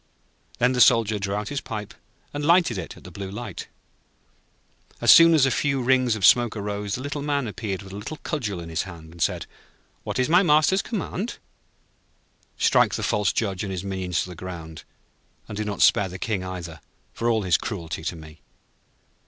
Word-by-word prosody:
Then 125 +2 +2
the 125 - +2
Soldier 115 -3 +5
drew 100 0 -2
out 105 0 -3
his 145 - -3
pipe, 105 -2 -6 0.4
and 145 0 -4
lighted 165 - +3
it 85 - -7
at - - -15
the - - -11
Blue 100 -1 -6
Light. 105 -1 -7 1.3
As - - +6
soon 165 0 +8
as 145 -4 +5
a 135 - +1
few 140 0 0
rings 130 -2 +2
of 100 -4 +1
smoke 120 0 +5
arose, 105 0 -3
the 130 - -6
Little 145 0 -4
Man 145 -2 -1
appeared 105 -2 -4
with 95 0 -11
a - - -6
little 105 +10 -6
cudgel 115 - -3
in 85 -1 -8
his 80 0 -1
hand, 85 -4 -10
and 85 0 -12
said: - - 0 0.6
'What - - -4
is 130 - +2
my 175 +4 +5
Master's 155 +3 +4
command?' 220 0 -4 1.2
'Strike - - +3
the - - -4
false 105 -2 +1
Judge 100 -5 -2
and 100 - -4
his 95 -1 -4
minions 95 -4 -2
to - - -9
the 90 - -8
ground, 80 -2 -8 0.6
and 105 - -7
do 105 - -2
not 105 -3 0
spare 95 - +4
the 95 - -7
King 100 -2 -2
either 85 -4 -7 0.3
for 115 - -1
all 110 -2 +1
his 90 -4 +3
cruelty 85 -6 -5
to - - -2
me.' 80 -1 -13
105 Hz, 200 wpm, -24 LUFS, 95-130 Hz, 1.3 s, soon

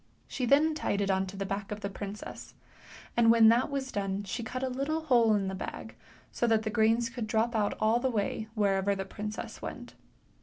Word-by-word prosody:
She 250 -2 -2
then 300 +5 +4
tied 205 -9 -1
it 200 -1 +1
on 190 0 0
to 195 +1 -8
the 195 - -2
back 195 +1 -4
of 210 0 -5
the 200 - -2
princess, 200 +1 -8 0.6
and 235 -1 +5
when 225 -1 +7
that 240 +5 +3
was 275 -2 -3
done 195 0 -2
she 205 +5 -4
cut 255 +3 -4
a - - +1
little 275 +5 -2
hole 240 -8 +4
in 195 -2 0
the 190 - -3
bag. 190 - -6 0.4
so 240 - 0
that 220 -1 +3
the 215 - -2
grains 225 +2 +3
could 230 -1 -5
drop 225 +2 +1
out 210 -2 +1
all 220 +2 +3
the 260 - 0
way 220 -1 -2
wherever 200 -1 +2
the 195 0 -4
princess 210 +2 -6
went. - - -7
220 Hz, 220 wpm, -30 LUFS, 200-240 Hz, 0.6 s, when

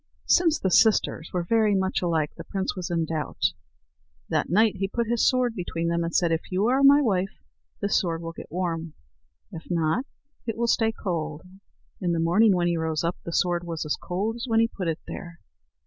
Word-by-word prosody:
Since 330 -3 +4
the 190 - -1
sisters 205 -6 +3
were 180 -1 -1
very 215 +2 +2
much 190 0 0
alike, 165 -4 0
the - - -8
prince 190 -1 -3
was 185 -1 -4
in 165 -2 0
doubt. 160 -1 -1 0.8
That - - 0
night 210 +4 +3
he 195 +1 -1
put 235 +4 -1
his 235 +1 +3
sword 255 -2 +1
between 170 -4 -3
them, 170 0 0
and 165 - -2
said: 170 0 +2
"If 165 +3 -2
you 190 +3 +1
are 265 +2 +3
my 285 +1 +7
wife, 195 -5 -1 0.4
this 200 - +3
sword 170 -2 -3
will 165 - -4
get - - -11
warm; 165 -3 -3 0.6
if 160 - -9
not, 170 - 0 0.4
it 225 - -2
will 235 - +1
stay 225 -1 +2
cold." 160 -7 -4 0.6
In 175 -2 0
the 165 - 0
morning 185 +5 +4
when 175 -1 +1
he 175 -1 +1
rose 160 -1 -1
up, 170 +1 -1
the 170 - -4
sword 175 0 +1
was 165 -2 -4
as 150 - 0
cold 205 +6 -3
as 240 - -5
when 225 -1 +3
he 230 - +4
put 190 -6 -5
it 160 -1 0
there. 170 -1 -8
180 Hz, 210 wpm, -25 LUFS, 165-220 Hz, 0.8 s, my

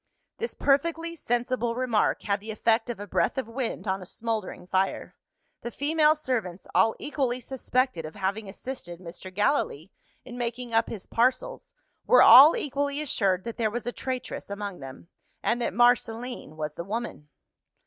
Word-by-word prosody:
This 465 - -3
perfectly 330 +4 +1
sensible 240 -3 -1
remark 245 -4 +1
had 200 0 0
the 215 +2 -11
effect 225 +2 +1
of 240 - -4
a 205 - -5
breath 205 - 0
of 265 - -2
wind 230 -2 -4
on 190 0 -1
a - - -8
smouldering 220 -5 -4
fire. 190 +1 -1 0.5
The 235 - -4
female 305 +4 +3
servants, 225 - -3
all 205 +5 +4
equally 265 -4 -2
suspected 255 -6 -1
of 155 0 -8
having 195 +2 -2
assisted 190 -5 -7
Mr. 180 +1 -9
Gallilee 195 - 0 0.3
in 245 -1 -8
making 240 0 -3
up 225 0 +2
his 205 -4 -7
parcels, 265 - -1 0.3
were - - +7
all 285 +5 +10
equally 285 0 -2
assured 195 -10 0
that 230 - -6
there 225 -2 +1
was 235 +2 -5
a 245 - -2
traitress 255 -3 -5
among 200 -2 -5
them 135 +4 -10 0.4
and 240 +1 +1
that - - 0
Marceline 240 -6 +1
was 150 -1 -4
the 170 - -6
woman. 205 -7 -5
235 Hz, 165 wpm, -27 LUFS, 195-260 Hz, 0.5 s, all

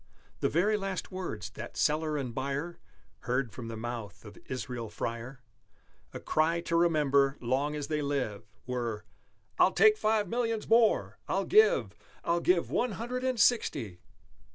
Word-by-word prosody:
The - - +1
very 205 +6 +2
last 195 -2 -4
words 110 - -5
that 115 +1 -8
seller 155 0 +1
and 130 -4 -4
buyer 140 +7 -3 0.4
Heard 125 +1 -1
from 115 +2 -8
the 115 -1 -6
mouth 115 -3 -6
of 105 - -11
Israel 125 -3 -5
Freyer 120 +4 -5 0.7
A - - -7
cry 160 +2 +1
to 170 -1 -2
remember 145 -5 +3
long 135 +5 0
as 145 -1 -3
they 150 0 -1
live 125 -7 -3
Were, 120 -4 -3 0.5
"I'll - - +5
take 430 -1 +6
Five 215 -1 +2
Millions 230 +1 -1
more! 225 -1 +3
I'll - - 0
give 435 +1 +4 0.3
I'll 170 0 +1
give 180 -1 +2
One 245 -3 0
Hundred 245 +5 -4
and 255 -2 0
Sixty!" 135 - +2
145 Hz, 155 wpm, -30 LUFS, 120-185 Hz, 0.7 s, take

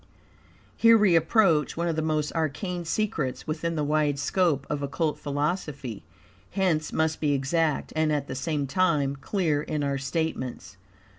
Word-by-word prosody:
Here 230 0 +6
we 200 -5 +4
approach 165 -2 +3
one 170 +1 0
of 165 - 0
the 160 - 0
most 155 -1 -1
arcane 170 +3 -2
secrets 165 -8 -2
within 165 +2 -2
the 150 - 0
wide 150 -1 +1
scope 145 -1 +1
of 150 -1 -2
Occult 150 +2 -1
philosophy, 145 - -3 0.5
hence 180 -5 0
must 160 0 0
be 150 -2 +2
exact, 150 +3 0
and 155 -1 +2
at 145 -2 0
the - - -5
same 145 +2 -2
time 145 -3 +1
clear, 150 +1 0
in 150 -1 -3
our 140 -1 -1
statements. 140 -2 -3
155 Hz, 155 wpm, -26 LUFS, 145-170 Hz, 0.5 s, Here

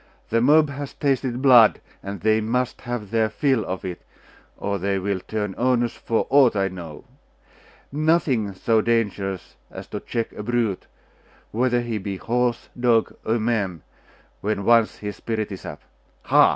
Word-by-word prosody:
The 115 +1 +2
mob 150 +3 +5
has 140 0 -6
tasted 130 -2 -1
blood, 120 -5 +7 0.2
and 100 -1 -6
they 110 +1 +3
must 125 +3 -1
have 115 -5 -4
their 110 -1 +2
fill 130 +1 +1
of 95 0 -5
it, 90 -2 -5 0.6
or 100 0 -2
they 100 +2 0
will 95 0 -1
turn 105 0 -3
onus 120 -1 +2
for 115 - -1
aught 135 -5 +5
I 95 -1 +1
know. 85 -5 -9 0.9
Nothing 145 -8 +1
so 110 +3 +2
dangerous 100 -5 -1
as - - -9
to - - -4
check 115 -1 -3
a - - -7
brute, 115 -3 -1 0.6
whether 120 +1 +1
he 115 -2 -3
be 95 0 -4
horse, 120 +3 -1
dog, 120 -2 +2
or 110 +2 +1
man, 105 -8 -1 0.6
when 100 -1 -2
once 115 -2 +4
his 105 -1 -6
spirit 110 -2 -3
is 95 - -7
up. - - -8 0.4
Ha! - - +5
115 Hz, 160 wpm, -23 LUFS, 100-120 Hz, 0.9 s, blood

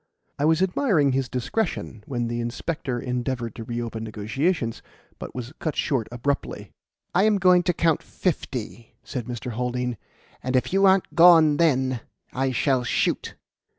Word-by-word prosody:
I 145 - +2
was 160 +3 +3
admiring 180 - +2
his 130 -1 -1
discretion 125 - -3
when 120 -3 -2
the 120 0 -3
inspector 125 +2 -3
endeavoured 125 -1 -3
to 115 - -7
reopen 115 -1 -4
negotiations, 115 - -1 0.4
but - - -8
was 125 +2 -6
cut 155 - -2
short 125 -6 0
abruptly. 130 +4 -3 0.4
"I 190 +3 +4
am 215 -1 +4
going 180 -2 +5
to 180 - +1
count 165 -2 +2
fifty," 125 - -4
said 125 -4 -5
Mr. 125 0 -5
Haldean, 125 0 -2 0.4
"and 130 +1 -2
if 130 - +1
you 195 0 +5
aren't 190 0 +3
gone 165 -3 +7
then, 130 -6 +2 0.3
I 135 +1 0
shall 130 0 +1
shoot." 120 - -1
130 Hz, 150 wpm, -24 LUFS, 120-165 Hz, 0.4 s, gone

